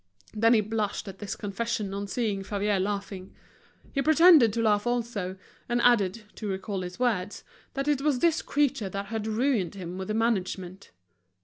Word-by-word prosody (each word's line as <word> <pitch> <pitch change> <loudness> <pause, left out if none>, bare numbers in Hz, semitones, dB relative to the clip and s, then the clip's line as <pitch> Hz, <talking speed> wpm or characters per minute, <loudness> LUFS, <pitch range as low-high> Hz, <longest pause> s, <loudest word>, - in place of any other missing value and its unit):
Then 225 +2 +4
he 215 - +4
blushed 215 -1 -2
at 195 -1 -8
this 205 - -4
confession 210 0 -3
on 200 +1 -4
seeing 205 -2 -1
Favier 205 0 0
laughing. 195 -1 -4 0.6
He 275 - +1
pretended 315 -5 +7
to 230 - 0
laugh 210 0 +2
also, 225 -6 -2 0.3
and 240 0 +1
added, 220 -3 +3
to 215 - -5
recall 195 0 -3
his 180 0 -6
words, 215 -6 -1 0.3
that 275 +1 -2
it 290 -2 +2
was 290 -2 +2
this 335 +4 +2
creature 280 -8 0
that 200 +1 -4
had 220 -1 -2
ruined 220 -5 0
him 180 -1 -6
with 190 - -5
the 215 - -2
management. 195 -4 -2
210 Hz, 175 wpm, -27 LUFS, 195-240 Hz, 0.6 s, pretended